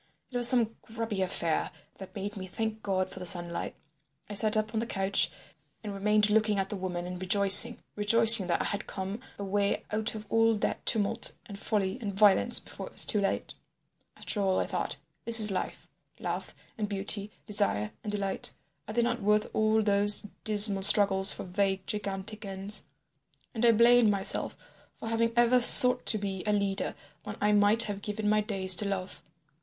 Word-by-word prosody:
It 250 - -4
was 240 -1 +7
some 235 -3 +2
grubby 225 -3 -6
affair 170 -3 -2 0.3
that 190 +2 -12
made 205 +1 -7
me 190 -2 -8
thank 220 +3 -6
God 190 -2 -3
for - - -10
the 180 - -8
sunlight. 175 -1 -3 0.5
I 210 - -9
sat 215 +1 +1
up 215 +1 -3
on 220 - -2
the 230 - -5
couch 195 -1 -1 0.5
and 210 -2 -7
remained 210 +1 0
looking 215 -1 0
at 195 0 -3
the - - -6
woman 180 -2 -6
and 180 0 -8
rejoicing—rejoicing 205 +2 +5
that 170 - -1
I - - -5
had 200 0 -4
come 195 +3 -7 0.2
away 200 0 -3
out 215 +1 -2
of 215 0 -9
all 225 +1 +1
that 205 - -4
tumult 225 +1 0
and 200 -3 -11
folly 200 +1 -3
and 205 -3 -5
violence 200 0 +3
before - - -11
it - - -15
was - - +8
too 210 - +1
late. 195 - -3 0.6
After 205 - -5
all, 190 -1 -1
I - - -2
thought, - - -5 0.3
this 230 0 +7
is 210 -1 +6
life—love 185 - -8 0.2
and 210 -1 -4
beauty, 200 +1 -5 0.2
desire 200 - -1
and 210 - -6
delight, 200 -2 -3 0.3
are 215 - -8
they 240 - +1
not 240 0 -3
worth 210 +1 -1
all 215 0 0
those 205 0 +4 0.2
dismal 205 -2 +2
struggles 195 -1 +6
for - - -7
vague, 190 0 -3
gigantic 210 0 -6
ends? 195 +1 -4 0.7
And 230 -1 -5
I 235 - +5
blamed 235 0 +3
myself 200 -2 -1 0.4
for 225 - -7
having 230 0 -1
ever 240 +1 +2
sought 250 +1 +7
to 220 - +3
be 195 -2 -6
a 210 - 0
leader 200 -1 -3 0.3
when 210 - -8
I 210 - 0
might 210 +2 +3
have 205 -1 -6
given 210 +1 -5
my 215 0 +1
days 195 -3 +2
to 205 - +3
love. 195 -1 -6
205 Hz, 185 wpm, -27 LUFS, 195-220 Hz, 0.7 s, was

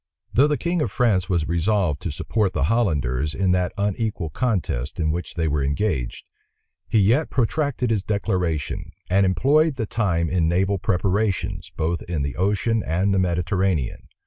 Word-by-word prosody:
Though 140 +5 +5
the 150 -1 +1
king 175 -1 -1
of 115 - -1
France 100 -7 +1
was 85 -4 +1
resolved 85 -2 +1
to 85 - -3
support 100 +6 -1
the 75 - 0
Hollanders 75 - 0
in 95 -1 +1
that 90 0 +1
unequal 100 -4 -1
contest 90 - -2
in 80 -2 +1
which 85 +2 -4
they 80 -1 0
were 75 -2 0
engaged, 70 - -1 0.6
he - - +1
yet 115 +10 +3
protracted 130 -1 0
his 105 -4 +1
declaration, 90 -8 -2 0.2
and 95 +1 +4
employed 140 - +3
the 115 -3 -2
time 90 -7 0
in 85 -2 +1
naval 95 +3 +1
preparations, 95 -1 -1
both 85 +2 -1
in 80 -5 -1
the 70 - -3
ocean 110 +4 +1
and 95 +5 +1
the 95 - +2
Mediterranean. 90 -4 0
95 Hz, 165 wpm, -23 LUFS, 85-110 Hz, 0.6 s, Though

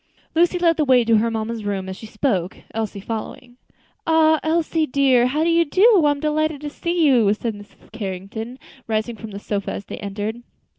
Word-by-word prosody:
Lucy 345 +2 +3
led 335 -2 +3
the 310 - +2
way 255 -3 +4
to 225 -1 +4
her 230 +2 +1
mamma's 225 0 -3
room, 195 -2 -3
as 190 - -5
she 220 - -10
spoke, 215 -6 -1 0.2
Elsie 215 -2 -3
following. 230 +4 -7 0.5
"Ah! 315 -1 +4
Elsie 320 0 0
dear, 260 -3 +3
how 300 +5 0
do 335 - +2
you 335 0 +4
do? 380 +4 +4
I'm 290 -1 +1
delighted 310 0 0
to 295 -1 -5
see 340 +1 0
you," 240 -8 +4
said 225 +1 -3
Mrs. 205 0 -15
Carrington, 215 +3 -6 0.3
rising 220 +1 -1
from 225 0 -9
the 200 - -7
sofa 200 0 -3
as 200 - -6
they - - -7
entered. 205 +3 -4
240 Hz, 195 wpm, -21 LUFS, 215-310 Hz, 0.5 s, way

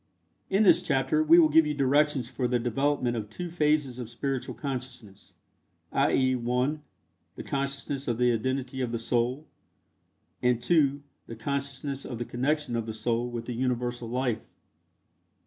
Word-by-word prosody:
In 195 +3 +3
this 195 - +6
chapter 135 +3 +1
we 160 +2 +6
will 165 -2 +7
give 155 0 +5
you 150 - -1
directions 140 -1 +2
for 125 0 -2
the 125 0 +1
development 125 +1 0
of 110 -2 -4
two 175 +10 -6
phases 150 -6 +1
of 120 -3 -6
spiritual 135 +2 -3
consciousness, 125 -7 -7 0.6
i.e., 130 -1 +2
(1) 125 +5 0 0.5
the - - -7
consciousness 140 0 -3
of 120 -2 0
the 125 0 +3
identity 130 +2 -2
of 125 -2 -1
the 115 - -1
Soul, 120 +5 -1 1.0
and 125 -1 +2
(2) 140 0 +2 0.2
the 115 - -7
consciousness 140 +2 -3
of 120 - -6
the 120 - -3
connection 140 +1 -1
of 115 -1 -2
the 110 - -4
Soul 120 +1 -1
with 120 -1 -5
the 125 - -4
Universal 120 -1 -2
Life. 125 -2 -1
130 Hz, 160 wpm, -28 LUFS, 120-140 Hz, 1.0 s, will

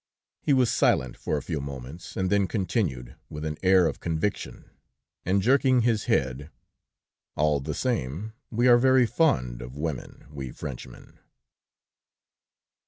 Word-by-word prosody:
He - - 0
was 130 -3 +4
silent 65 -1 +2
for 75 - -2
a 70 - -5
few 80 -5 -3
moments, 70 +3 -8
and 95 0 0
then 100 -1 +3
continued, 90 - -2
with 75 +1 -6
an 75 -1 -4
air 95 -1 +5
of - - -2
conviction, 85 +5 -3 0.6
and 95 +1 +2
jerking 130 +1 +4
his 115 -2 +1
head: 65 +3 0 0.9
"All 75 -1 +2
the 75 +2 -4
same, 110 - -2 0.2
we 120 +2 +1
are 120 -1 +7
very 130 0 +5
fond 65 - +1
of 60 +3 -9
women, 75 -4 -5
we 70 -3 -6
Frenchmen!" 65 -1 -9
85 Hz, 140 wpm, -26 LUFS, 70-115 Hz, 0.9 s, are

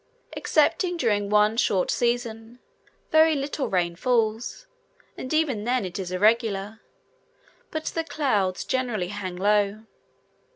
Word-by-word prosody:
Excepting 355 -2 +1
during 205 -8 0
one 210 +1 +3
short 190 -6 +1
season, 235 -1 -2 0.5
very 315 0 +5
little 280 0 -2
rain 175 -2 0
falls, 230 - -1 0.5
and 260 - -7
even 300 -9 +1
then 245 -2 0
it 180 +1 -6
is 185 -2 -5
irregular; 210 +1 +1 0.9
but 315 -1 -5
the 330 - -2
clouds 210 - -1
generally 240 -8 -1
hang 190 -3 -5
low. 205 +2 +1
220 Hz, 120 wpm, -25 LUFS, 200-255 Hz, 0.9 s, very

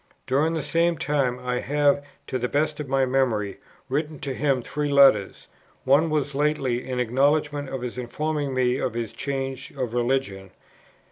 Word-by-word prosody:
During 150 +5 +1
the 160 - -2
same 170 +2 +1
time 135 -4 0
I 125 0 -2
have, 145 +1 +2 0.2
to 130 - -3
the 125 0 -1
best 150 +1 0
of 145 -3 -5
my 135 0 +3
memory, 120 -6 0 0.3
written 150 +3 -2
to 135 - -3
him 135 -2 0
three 150 +3 -2
letters. 135 -8 +4 0.4
One 145 +5 +4
was 145 -2 -1
lately, 135 -4 0
in 125 -1 -2
acknowledgment 145 +3 +1
of 130 -2 -5
his 125 0 -4
informing 145 +3 -2
me 130 -1 +1
of 120 - -2
his 115 -2 -3
change 135 -1 -4
of 125 -4 -2
religion. 120 -6 -1
135 Hz, 165 wpm, -25 LUFS, 125-145 Hz, 0.4 s, letters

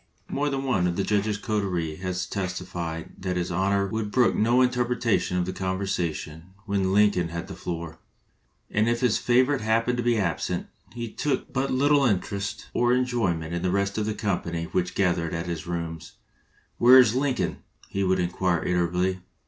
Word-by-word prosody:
More 145 +1 0
than 135 -1 -2
one 110 -10 +1
of 85 - -1
the 100 - 0
judge's 105 0 0
coterie 95 -8 -2
has 90 0 -3
testified 90 -3 -4
that 90 -1 -2
his 90 0 -2
Honor 100 +2 +1
would 105 +2 -3
brook 120 +2 +3
no 120 +4 +3
interruption 125 -6 +1
of 90 - +1
the 95 - -4
conversation 95 -3 -3
when 100 -2 0
Lincoln 100 -3 +3
had 85 +2 -5
the 100 - -7
floor; 85 -3 -6 0.7
and 110 +2 +2
if 120 0 0
his 125 -4 +2
favorite 130 +2 +3
happened 115 +3 +1
to 120 - -1
be 120 -1 +2
absent, 85 -6 -1 0.3
he 120 -1 -4
took 145 - -2
but 135 +1 0
little 145 +2 +3
interest 100 -3 -1
or 120 +1 +3
enjoyment 105 -11 0
in 85 - -2
the 90 - 0
rest 100 +1 0
of 105 - -1
the 110 - -1
company 85 -6 -2
which 90 -1 -1
gathered 85 -4 +1
at 85 +1 -3
his 85 -2 -5
rooms. 85 -2 -5 0.7
"Where 125 +2 +8
's 110 - 0
Lincoln?" 130 -1 0 0.3
he 100 - -2
would 95 0 +2
inquire 90 -1 0
irritably. 90 +1 +1
100 Hz, 175 wpm, -26 LUFS, 90-120 Hz, 0.7 s, Where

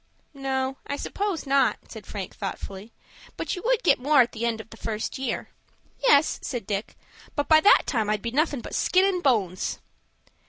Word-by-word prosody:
"No, 265 -1 -2
I 285 - -2
suppose 390 +3 -3
not," 275 0 +3
said - - -11
Frank, - - -6
thoughtfully. 200 +3 -6 0.5
"But - - -2
you 360 - -6
would - - +2
get 355 - +4
more 285 +2 +5
at 240 0 +1
the 235 +1 -2
end 225 -1 -1
of 220 - -11
the 225 - -11
first 220 +4 -4
year." 255 -4 -3 0.5
"Yes," 320 -12 +4
said 245 -6 -4
Dick; 200 +1 -4 0.4
"but 290 -1 -1
by 315 -1 +6
that 405 - +6
time 220 -6 0
I'd 210 -1 -1
be 235 - -2
nothin' 285 -1 +1
but - - -9
skin 370 +1 +3
and 375 -2 +1
bones." 205 - +1
265 Hz, 190 wpm, -25 LUFS, 225-310 Hz, 0.5 s, by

